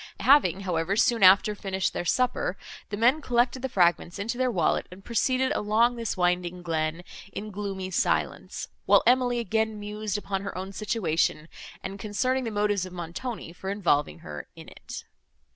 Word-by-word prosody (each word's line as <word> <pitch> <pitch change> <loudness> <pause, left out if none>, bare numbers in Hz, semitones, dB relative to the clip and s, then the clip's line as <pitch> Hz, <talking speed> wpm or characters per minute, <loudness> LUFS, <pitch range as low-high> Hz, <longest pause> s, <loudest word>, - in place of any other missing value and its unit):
Having, 195 - +5
however, 180 0 -1
soon 230 +1 +3
after, 195 +3 +7
finished 190 -2 -2
their - - -3
supper, 250 +6 0 0.3
the 205 - -4
men 250 +8 +4
collected 245 0 +1
the 265 - -2
fragments 175 -2 +2
into 220 +4 -3
their 255 0 +1
wallet, 175 -9 +1
and 185 +2 -13
proceeded 255 +3 +1
along 225 +4 +2
this 230 -4 -3
winding 180 0 0
glen, 160 0 -2 0.3
in 215 +2 -6
gloomy 195 -2 -4
silence; - - -1 0.2
while - - +6
Emily 245 -1 +3
again 220 -1 -1
mused 210 0 -3
upon 195 -2 -3
her 200 -2 -6
own 190 +1 -5
situation, 170 -7 0 0.4
and 195 +1 -6
concerning 255 +6 -1
the - - -1
motives 205 -2 0
of 185 -1 -7
Montoni 175 +3 -6
for 190 +2 -6
involving 150 - +1
her 75 -2 -7
in - - -11
it. - - -9
200 Hz, 165 wpm, -27 LUFS, 180-230 Hz, 0.4 s, after